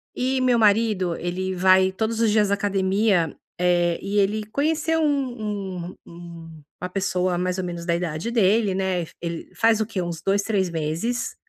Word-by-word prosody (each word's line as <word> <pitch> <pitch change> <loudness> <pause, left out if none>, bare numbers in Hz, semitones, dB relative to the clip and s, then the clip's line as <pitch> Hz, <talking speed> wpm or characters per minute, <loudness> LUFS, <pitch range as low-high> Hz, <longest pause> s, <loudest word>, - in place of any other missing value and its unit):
E 260 +1 0
meu 250 -2 +3
marido 205 -5 +2
ele 185 +2 -3
vai 185 +1 +4
todos 220 +3 -2
os 220 -2 +3
dias 210 -2 +3
à - - +4
academia, 195 -3 +1 0.2
eh, 175 -1 +2
e 205 +1 -2
ele 210 +2 +1
conheceu 315 +6 0
um 215 - -2
um 180 - -10
um 170 -2 -11 0.2
uma 180 - -3
pessoa 185 -1 -1
mais 180 +1 -1
ou 185 - -2
menos 170 -1 -5
da 170 -1 +1
idade 170 +3 -3
dele, 210 -2 +2
né. 190 -2 -1 0.2
Ele 170 -1 -4
f - - -24
faz 225 -1 +3
o - - +1
quê? 200 -4 -3
Uns 170 -2 -5
2, 200 +1 +1
3 195 -4 0
meses. 165 +9 -2
190 Hz, 185 wpm, -23 LUFS, 175-220 Hz, 0.2 s, vai